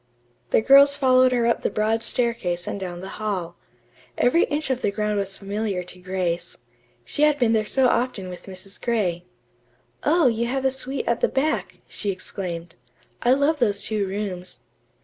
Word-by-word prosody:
The -, -, +3 dB
girls 280 Hz, +3 st, +7 dB
followed 255 Hz, -2 st, +4 dB
her 240 Hz, -2 st, +1 dB
up 235 Hz, -, +1 dB
the -, -, 0 dB
broad 220 Hz, +1 st, 0 dB
staircase 220 Hz, -9 st, -1 dB
and -, -, -4 dB
down 175 Hz, -2 st, -6 dB
the 190 Hz, -, -7 dB
hall. 185 Hz, -5 st, -3 dB, 0.6 s
Every 290 Hz, +8 st, +4 dB
inch 295 Hz, -1 st, -2 dB
of 255 Hz, -1 st, -1 dB
the -, -, +1 dB
ground 210 Hz, 0 st, -1 dB
was 195 Hz, -1 st, -3 dB
familiar 200 Hz, -2 st, -3 dB
to 180 Hz, +1 st, -8 dB
Grace. 180 Hz, -2 st, -3 dB, 0.5 s
She 285 Hz, -, -3 dB
had 300 Hz, -1 st, +4 dB
been 240 Hz, -4 st, +2 dB
there 215 Hz, -1 st, +1 dB
so 265 Hz, +2 st, +3 dB
often 235 Hz, -5 st, 0 dB
with 180 Hz, +1 st, -9 dB
Mrs. 190 Hz, +1 st, -9 dB
Gray. 185 Hz, -8 st, -1 dB, 0.8 s
"Oh, 325 Hz, +1 st, +3 dB
you 235 Hz, -1 st, +2 dB
have 265 Hz, +2 st, -2 dB
the 265 Hz, -, +2 dB
suite 265 Hz, 0 st, -3 dB
at 235 Hz, -, 0 dB
the -, -, +3 dB
back," 300 Hz, +4 st, -1 dB
she 205 Hz, -, -4 dB
exclaimed. 175 Hz, -3 st, -5 dB, 0.5 s
"I 245 Hz, +1 st, +4 dB
love 285 Hz, +3 st, +2 dB
those 205 Hz, -5 st, +2 dB
two 210 Hz, -3 st, -1 dB
rooms." 190 Hz, -2 st, -5 dB
215 Hz, 180 wpm, -23 LUFS, 190-255 Hz, 0.8 s, girls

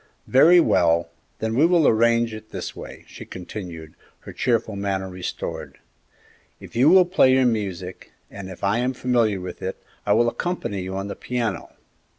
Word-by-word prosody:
"Very 165 Hz, +7 st, +6 dB
well; 85 Hz, -, +2 dB, 0.3 s
then 110 Hz, 0 st, -2 dB
we 135 Hz, +6 st, +3 dB
will 170 Hz, -2 st, +4 dB
arrange 115 Hz, 0 st, +3 dB
it 110 Hz, 0 st, -10 dB
this -, -, -6 dB
way," -, -, -10 dB
she -, -, -10 dB
continued, 90 Hz, -4 st, -8 dB, 0.3 s
her -, -, -10 dB
cheerful 115 Hz, -3 st, 0 dB
manner 100 Hz, -1 st, -2 dB
restored; 90 Hz, -1 st, -6 dB, 0.8 s
"you 125 Hz, +6 st, +2 dB
will 185 Hz, +1 st, +7 dB
play 175 Hz, -8 st, +4 dB
your 130 Hz, 0 st, +4 dB
music, 95 Hz, -6 st, -3 dB, 0.2 s
and, 100 Hz, -1 st, -8 dB
if 95 Hz, -, -11 dB
I 100 Hz, +4 st, +1 dB
am 125 Hz, +2 st, 0 dB
familiar 120 Hz, -6 st, +1 dB
with 90 Hz, -1 st, -8 dB
it, 95 Hz, -, -4 dB, 0.3 s
I 100 Hz, -, +2 dB
will 120 Hz, +2 st, +3 dB
accompany 120 Hz, -, -3 dB
you 95 Hz, +1 st, -5 dB
on 95 Hz, +1 st, -4 dB
the 100 Hz, -, -6 dB
piano. 115 Hz, -7 st, -4 dB
110 Hz, 165 wpm, -23 LUFS, 95-125 Hz, 0.8 s, will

